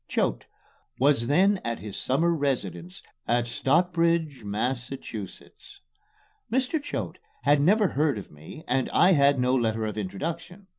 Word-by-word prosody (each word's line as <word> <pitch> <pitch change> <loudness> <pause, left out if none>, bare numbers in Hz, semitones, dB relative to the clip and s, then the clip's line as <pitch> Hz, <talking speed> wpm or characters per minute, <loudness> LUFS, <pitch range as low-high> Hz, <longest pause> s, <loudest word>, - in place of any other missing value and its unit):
Choate - - -1 0.5
was 135 -3 +2
then 190 +7 +3
at 115 0 -2
his 105 -2 -8
summer 160 +7 +1
residence 95 - -3 0.2
at 120 0 +2
Stockbridge, 165 +1 +1
Massachusetts. 120 -1 -6 0.7
Mr. 260 +5 0
Choate 290 - -5 0.2
had 145 -1 +4
never 200 +5 +4
heard 145 -4 0
of 100 - -9
me 80 - -12
and 130 +1 0
I 180 - +4
had 140 -4 +4
no 125 +1 +2
letter 115 -3 0
of 105 0 -4
introduction. 165 - -5
135 Hz, 135 wpm, -26 LUFS, 115-170 Hz, 0.7 s, had